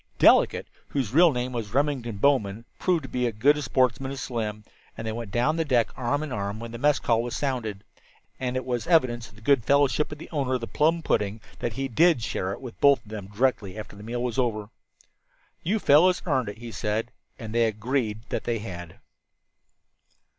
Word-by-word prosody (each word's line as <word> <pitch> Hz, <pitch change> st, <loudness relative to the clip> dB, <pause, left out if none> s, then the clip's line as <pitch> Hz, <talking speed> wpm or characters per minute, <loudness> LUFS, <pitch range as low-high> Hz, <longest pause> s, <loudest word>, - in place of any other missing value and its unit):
Delicate, -, -, +5 dB, 0.2 s
whose 130 Hz, -5 st, -2 dB
real 170 Hz, +2 st, +7 dB
name 125 Hz, -1 st, -2 dB
was 115 Hz, -2 st, -5 dB
Remington 135 Hz, -6 st, 0 dB
Bowman, 110 Hz, -3 st, +1 dB
proved 175 Hz, -5 st, +1 dB
to -, -, -6 dB
be 125 Hz, -1 st, 0 dB
as 115 Hz, -, -4 dB
good 140 Hz, +7 st, +4 dB
a 150 Hz, -, -3 dB
sportsman 130 Hz, 0 st, +1 dB
as 135 Hz, -, -5 dB
Slim, 110 Hz, -5 st, -3 dB, 0.3 s
and 115 Hz, -, -5 dB
they 110 Hz, -, -2 dB
went 115 Hz, -1 st, -5 dB
down 125 Hz, +10 st, +1 dB
the 165 Hz, -, +2 dB
deck 125 Hz, -6 st, +2 dB
arm 135 Hz, +4 st, -1 dB
in 155 Hz, -, -6 dB
arm 100 Hz, -2 st, -3 dB
when 115 Hz, 0 st, -7 dB
the 115 Hz, -, -7 dB
mess 145 Hz, +2 st, +3 dB
call 115 Hz, -1 st, +1 dB
was 120 Hz, 0 st, -4 dB
sounded. 115 Hz, -8 st, -2 dB, 0.6 s
And 130 Hz, -1 st, -2 dB
it 130 Hz, -, -2 dB
was 125 Hz, +1 st, -2 dB
evidence 125 Hz, -9 st, +2 dB
of -, -, -20 dB
the 110 Hz, -, -16 dB
good 135 Hz, -2 st, +4 dB
fellowship 140 Hz, +3 st, +2 dB
of 150 Hz, -, -6 dB
the 155 Hz, -, -10 dB
owner 135 Hz, -5 st, 0 dB
of 125 Hz, -, -2 dB
the -, -, -3 dB
plum 160 Hz, +6 st, +1 dB
pudding 105 Hz, -3 st, 0 dB, 0.2 s
that 120 Hz, -, -2 dB
he 135 Hz, +3 st, -2 dB
did 155 Hz, 0 st, +3 dB
share 95 Hz, -4 st, -2 dB
it 100 Hz, -, -6 dB
with 125 Hz, -3 st, -10 dB
both 140 Hz, -4 st, +5 dB
of 105 Hz, -, -14 dB
them 105 Hz, -3 st, -6 dB
directly 105 Hz, -2 st, 0 dB
after 105 Hz, -1 st, -8 dB
the 100 Hz, -, -11 dB
meal 120 Hz, +3 st, -3 dB
was 125 Hz, +1 st, -2 dB
over. 110 Hz, -4 st, -1 dB, 0.9 s
"You 200 Hz, +6 st, 0 dB
fellows 180 Hz, 0 st, +4 dB
earned 130 Hz, -, +1 dB
it," 100 Hz, -, -8 dB
he 120 Hz, 0 st, -8 dB
said. 110 Hz, +3 st, -2 dB, 0.3 s
And 110 Hz, -2 st, -7 dB
they 115 Hz, 0 st, +3 dB
agreed 110 Hz, 0 st, -1 dB
that -, -, -3 dB
they 120 Hz, -1 st, 0 dB
had. 90 Hz, -6 st, -8 dB
120 Hz, 215 wpm, -26 LUFS, 110-140 Hz, 0.9 s, real